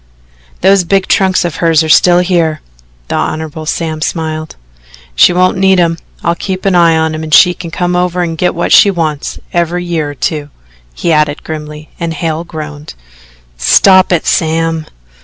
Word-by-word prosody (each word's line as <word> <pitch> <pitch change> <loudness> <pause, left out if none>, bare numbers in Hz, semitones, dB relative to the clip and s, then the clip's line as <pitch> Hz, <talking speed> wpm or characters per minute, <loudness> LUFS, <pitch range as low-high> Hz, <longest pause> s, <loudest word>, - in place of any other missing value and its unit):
"Those 195 0 +4
big 195 +2 +1
trunks 190 -2 +1
of 170 - -4
hers 165 -2 +2
are - - -3
still 175 +3 +4
here." 170 -4 0 0.5
The - - -1
Hon. 155 0 -4
Sam 160 -1 -3
smiled. 155 -1 -4 0.6
"She 60 - +5
won't 185 +1 +1
need 190 -1 +3
'em. 165 -1 +1 0.2
I'll 170 - +1
keep 185 +2 -5
an 195 - +2
eye 170 -2 +4
on 160 0 0
'em 155 - -5
and 160 -1 -7
she 180 +4 +6
can 175 -1 -8
come 180 +2 -2
over 180 0 0
and 165 -1 -3
get 180 +2 -1
what 170 - -2
she 205 - +7
wants 160 -6 -3 0.2
every 175 +1 -1
year 165 -4 -2
or 145 - -8
two," 150 +1 -3 0.5
he 170 - -1
added 150 -1 0
grimly, 150 -1 -8
and 165 -1 -3
Hale 160 +1 -3
groaned. 155 -3 -9 0.6
"Stop 185 - +4
it, 170 -3 0
Sam." 165 0 0
165 Hz, 175 wpm, -12 LUFS, 155-180 Hz, 0.6 s, she